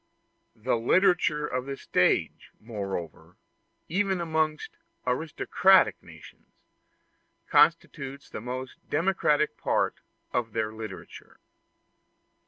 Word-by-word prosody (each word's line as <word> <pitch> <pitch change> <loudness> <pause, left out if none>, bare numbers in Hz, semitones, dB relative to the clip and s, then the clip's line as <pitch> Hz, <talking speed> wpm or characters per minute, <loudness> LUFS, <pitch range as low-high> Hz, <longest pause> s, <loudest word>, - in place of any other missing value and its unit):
The 120 +2 0
literature 155 - +3
of 125 -1 -3
the 140 0 -4
stage, - - +1
moreover, 100 -7 -6 0.5
even 190 +1 0
amongst 160 -2 -1 0.3
aristocratic 160 +8 +3
nations, - - -16 0.9
constitutes 140 -4 +2
the - - -7
most 130 +2 -6
democratic 150 -6 +1
part - - 0 0.3
of 115 -3 -1
their 110 -1 -1
literature. 110 -3 -10
140 Hz, 85 wpm, -27 LUFS, 115-165 Hz, 0.9 s, literature